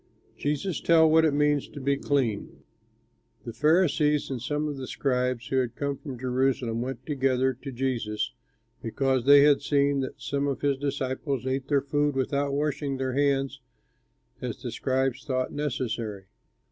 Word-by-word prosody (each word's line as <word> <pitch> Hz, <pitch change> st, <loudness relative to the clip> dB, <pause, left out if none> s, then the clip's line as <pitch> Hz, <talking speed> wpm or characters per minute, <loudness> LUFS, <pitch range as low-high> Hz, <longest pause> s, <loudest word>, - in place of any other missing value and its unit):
JESUS 150 Hz, +4 st, -2 dB
TELLS 160 Hz, -1 st, +5 dB
WHAT 160 Hz, 0 st, +5 dB
IT 155 Hz, -, +2 dB
MEANS 145 Hz, -1 st, +2 dB
TO 145 Hz, -, -10 dB
BE 140 Hz, +1 st, +1 dB
CLEAN 130 Hz, -7 st, -1 dB, 0.8 s
The 115 Hz, -, -6 dB
Pharisees 150 Hz, -1 st, +2 dB
and 125 Hz, -3 st, -3 dB
some 150 Hz, +4 st, -1 dB
of 145 Hz, -2 st, -4 dB
the 130 Hz, -1 st, -6 dB
scribes 125 Hz, -2 st, -1 dB
who 135 Hz, -, 0 dB
had 125 Hz, -2 st, 0 dB
come 140 Hz, -1 st, -2 dB
from 135 Hz, -2 st, -8 dB
Jerusalem 125 Hz, -2 st, 0 dB
went 130 Hz, +2 st, -5 dB
together 130 Hz, -2 st, +1 dB
to 140 Hz, -, -6 dB
Jesus, 120 Hz, -3 st, -2 dB, 0.5 s
because 130 Hz, +2 st, 0 dB
they 140 Hz, 0 st, +8 dB
had 145 Hz, -1 st, +5 dB
seen 140 Hz, 0 st, +2 dB
that 130 Hz, -, -4 dB
some 140 Hz, 0 st, -1 dB
of 140 Hz, -3 st, -2 dB
his 140 Hz, -2 st, +1 dB
disciples 135 Hz, -1 st, -2 dB
ate 130 Hz, 0 st, -2 dB
their 140 Hz, -2 st, +2 dB
food 145 Hz, 0 st, 0 dB
without 140 Hz, +2 st, 0 dB
washing 145 Hz, -1 st, -1 dB
their 130 Hz, -1 st, -2 dB
hands 135 Hz, -1 st, 0 dB, 0.8 s
as -, -, -4 dB
the -, -, -4 dB
scribes 130 Hz, -1 st, -1 dB
thought 130 Hz, -3 st, -2 dB
necessary. 115 Hz, -8 st, -3 dB
135 Hz, 160 wpm, -27 LUFS, 130-145 Hz, 0.8 s, they